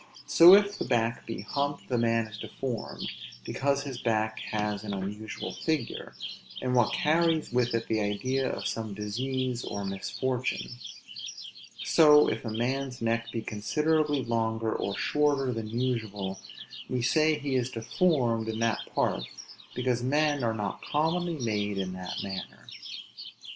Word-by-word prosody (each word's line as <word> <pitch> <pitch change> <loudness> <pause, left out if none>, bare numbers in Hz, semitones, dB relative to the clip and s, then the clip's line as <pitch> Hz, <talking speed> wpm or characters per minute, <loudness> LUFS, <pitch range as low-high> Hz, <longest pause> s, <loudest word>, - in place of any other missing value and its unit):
So 175 +3 +9
if 205 0 +3
the - - -1
back 115 -2 0
be 115 - -4
humped, 145 +6 -2
the 125 - 0
man 115 -1 +2
is 110 0 -10
deformed; 125 -4 -4 0.4
because 140 0 0
his 135 -4 -5
back 110 -1 0
has 105 -1 -1
an 100 -2 -3
unusual 105 +3 -5
figure, 155 -7 -2 0.4
and 125 - -1
what 120 -3 +4
carries 160 -2 +2
with 125 -1 +2
it 115 - -1
the 110 - +1
idea 130 +6 0
of - - -4
some 110 -3 -3
disease 125 +4 -2
or 100 -1 -4
misfortune; 115 +9 -2 1.1
So 150 -2 +7
if - - -1
a 115 - -3
man's 125 +3 -1
neck 115 0 0
be 115 -1 -3
considerably 150 +7 +1
longer 115 -1 0
or 100 - -2
shorter 145 -3 +2
than 115 -1 -4
usual, 110 -5 -2 0.5
we 125 -2 -1
say 155 +3 +3
he 140 -2 -3
is 130 -1 +1
deformed 120 -1 +1
in 110 - -2
that 115 -1 +1 0.2
part, - - +1 0.5
because 125 -1 0
men 145 +1 +2
are 115 -1 +1
not 105 -2 -3
commonly 165 +3 0
made 105 -5 -1
in 95 -1 -2
that 90 0 -5
manner. 95 -1 -6
120 Hz, 150 wpm, -29 LUFS, 110-140 Hz, 1.1 s, So